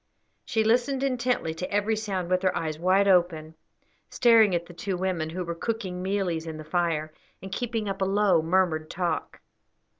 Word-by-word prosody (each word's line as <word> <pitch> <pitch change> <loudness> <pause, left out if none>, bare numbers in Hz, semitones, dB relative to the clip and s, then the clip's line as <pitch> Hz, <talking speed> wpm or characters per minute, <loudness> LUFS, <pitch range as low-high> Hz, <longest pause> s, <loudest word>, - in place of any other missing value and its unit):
She 220 -1 0
listened 245 +4 +1
intently 250 -10 0
to 170 +3 -6
every 205 +2 +1
sound, 195 -5 -3
with 185 0 +2
her 185 -1 +1
eyes 155 -1 -3
wide 190 +3 +3
open, 170 -4 +2 0.6
staring 225 -6 +5
at 170 0 -2
the 175 - -12
two 190 +1 -3
women, 180 -4 -2
who 180 +3 -4
were 170 - -3
cooking 185 -1 -4
mealies 185 -4 -1
in 160 -1 -5
the 155 - -8
fire, 155 -2 -1 0.3
and 190 +1 -9
keeping 225 0 -2
up 195 0 -4
a - - +3
low, 195 -3 +3
murmured 160 -2 +1
talk. 175 -1 -3
185 Hz, 180 wpm, -26 LUFS, 170-210 Hz, 0.6 s, staring